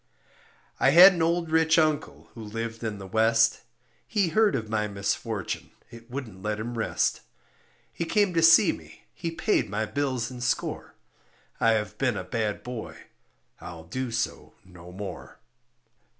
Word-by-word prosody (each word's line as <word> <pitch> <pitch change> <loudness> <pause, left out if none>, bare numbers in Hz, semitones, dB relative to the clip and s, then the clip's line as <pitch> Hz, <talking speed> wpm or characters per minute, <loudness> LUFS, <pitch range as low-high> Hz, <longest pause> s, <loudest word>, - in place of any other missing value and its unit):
I 135 - +4
had 180 +7 +9
an 170 - -3
old 165 0 0
rich 160 0 +3
uncle, 155 -2 0
who 115 - -9
lived 115 +2 -5
in 110 -2 -3
the 100 - -9
West, 115 +3 +2 0.5
He 200 -6 +1
heard 210 +4 +3
of 110 - -3
my 105 -1 -1
misfortune, 100 0 -3 0.2
it 115 0 -13
wouldn't 120 -8 -7
let 105 +1 -2
him 120 +2 -5
rest; 115 - 0 0.7
He 170 - -3
came 200 +1 +1
to 165 - +2
see 165 +3 +7
me, - - -12
he 170 - -4
paid 165 - 0
my 110 +2 -1
bills 130 -1 -2
and 125 -1 -7
score, - - -2 0.6
I 115 - +4
have 105 -1 -3
been 125 -6 +1
a 90 - -4
bad 105 +2 -3
boy, 125 -2 -7 0.6
I'll 85 -2 -9
do 130 +10 -4
so 115 0 -4
no 90 -1 -13
more. 95 -2 -8
115 Hz, 160 wpm, -26 LUFS, 105-160 Hz, 0.7 s, had